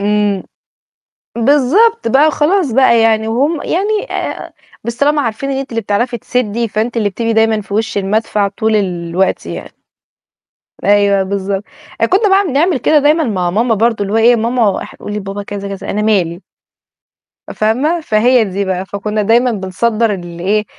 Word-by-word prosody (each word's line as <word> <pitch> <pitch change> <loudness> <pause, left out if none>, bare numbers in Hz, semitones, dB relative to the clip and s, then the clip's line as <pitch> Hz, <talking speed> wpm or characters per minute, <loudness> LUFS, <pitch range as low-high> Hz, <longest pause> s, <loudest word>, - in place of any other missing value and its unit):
إمم. 205 -1 0 0.9
بالضبط، 290 - +3
بقى 285 +6 +4
خلاص 310 -1 +1
بقى 235 -2 +4
يعني 220 -1 +2
وهُم 280 +8 0
يعني 415 +6 -1
آآ - - -4 0.3
بس 235 0 -4
طلاما 290 +2 +2
عارفين 230 +4 -3
إن 270 - -2
أنتِ 270 0 -5
اللي 230 -1 -2
بتعرفي 230 +4 -1
تسدّي 235 0 -2
فأنتِ 225 +4 -2
اللي 215 -3 +1
بتبقي 230 +3 -2
دايمًا 220 -1 +2
في 200 0 -7
وِش 220 0 -1
المدفع 205 +1 0
طول 220 +2 0
الوقت 180 -1 -1
يعني. - - -7 1.1
أيوه، 200 -1 +3
بالضبط. 195 0 -3 0.4
آآ - - +5
كنّا 400 +3 +2
بقى 390 0 +3
بنعمل 300 +4 +1
كده 300 +4 +3
دايمًا 300 +3 +3
مع 185 -9 -1
ماما 225 +5 +1
برضه 225 0 +1
اللي 200 +1 -2
هو 225 - +3
إيه 235 +2 +5
ماما 230 -3 0
أح - - -11
قولي 210 0 -6
لبابا 195 0 -5
كذا، 200 0 -6
كذا، 195 - -8
"أنا 210 - -1
مالي." 185 -5 0 1.1
فاهمة، 265 +11 0
فهي 240 -2 +3
دي 200 0 -3
بقى 190 0 -3
فكنّا 210 +2 -3
دايمًا 235 +4 +3
بنصدّر 215 +3 0
اللي 175 -2 -8
إيه، 210 +2 +1
220 Hz, 165 wpm, -15 LUFS, 200-255 Hz, 1.1 s, آآ